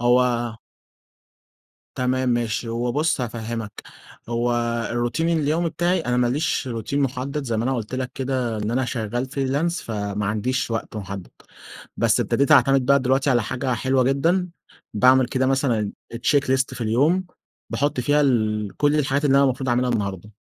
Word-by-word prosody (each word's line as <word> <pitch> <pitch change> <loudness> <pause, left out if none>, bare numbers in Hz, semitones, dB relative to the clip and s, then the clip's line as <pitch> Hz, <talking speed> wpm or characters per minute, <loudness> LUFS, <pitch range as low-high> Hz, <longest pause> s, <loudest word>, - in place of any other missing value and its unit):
هو 120 -2 +2 1.4
تمام 130 0 0
ماشي، 120 -1 -1
هو 120 +1 -1
بُصّ 150 -2 +1
هافهمّك، 115 -2 -5 0.5
هو 120 +1 0 0.4
الروتين 120 +8 -1
اليومي 155 +3 +1
بتاعي 175 +3 0
أنا 125 -5 -1
ما 125 -1 +3
ليش 135 +1 -1
روتين 120 +4 -2
محدّد 140 +2 -2
زي 115 -3 -1
ما 110 - -1
أنا 135 +2 0
قُلت 115 0 -4
لك 130 0 -3
كده 130 -4 -2
إن 105 +1 -2
أنا 130 +2 0
شغال 120 +1 -3
فريلانس 140 +5 -1
فما 105 -2 -3
عنديش 115 +5 -1
وقت 110 -1 -4
محدّد 100 -2 -6 0.7
بس - - +2
ابتديت 140 +3 +2
أعتمد 135 -3 +5
بقى 140 +1 +5
دلوقتي 135 +2 +1
على 120 -3 +3
حاجة 130 +2 -2
حلوة 130 +3 +1
جدًا 165 +8 +1 0.5
باعمل 130 +3 +5
كده 130 +1 0
مثلًا 130 -6 +1 0.2
check 140 +4 +2
list 130 0 -1
في 125 - -9
اليوم 140 +12 +2 0.5
باحُط 145 -2 0
فيها 145 +4 +2
ال 110 -6 +1
كل 145 +1 +2
الحاجات 140 +1 0
اللي 140 -1 +4
أنا 140 - +5
المفروض 130 0 -1
اعملها 125 +1 +1
النهارده، 100 -3 -3
125 Hz, 160 wpm, -23 LUFS, 115-140 Hz, 1.4 s, أعتمد